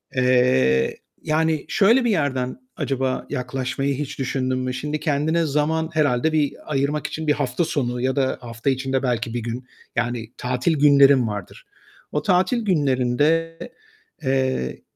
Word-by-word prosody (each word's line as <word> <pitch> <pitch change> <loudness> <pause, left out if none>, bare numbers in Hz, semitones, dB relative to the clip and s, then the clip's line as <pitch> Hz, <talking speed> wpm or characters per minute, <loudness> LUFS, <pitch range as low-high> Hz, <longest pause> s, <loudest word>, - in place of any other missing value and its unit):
Eee, 125 - +3 0.3
yani 155 -1 0
şöyle 230 +5 +4
bir 235 - +2
yerden 135 - -1 0.2
acaba 135 -1 -1
yaklaşmayı 130 +2 -2
hiç 145 -1 -5
düşündün 130 -1 -1
mü? 130 0 -2
Şimdi 150 +4 -3
kendine 160 +2 +1
zaman 160 +2 0
herhâlde 150 -1 +1
bir 150 -2 +1 0.2
ayırmak 140 +2 0
için 160 0 -5
bir 150 - +4
hafta 145 +2 -1
sonu 125 -6 -2
ya 130 +1 0
da 135 -2 0
hafta 115 +2 -3
içinde 130 0 -1
belki 120 -2 -1
bir 120 - -1
gün 120 +2 -5 0.3
yani 120 -2 -2
tatil 125 +6 0
günlerin 140 -3 +6
vardır. 105 -4 -7 0.5
O 150 - -1
tatil 190 +5 +2
günlerinde, 150 0 +1 0.7
eee, 130 - -1
135 Hz, 140 wpm, -22 LUFS, 125-155 Hz, 0.7 s, günlerin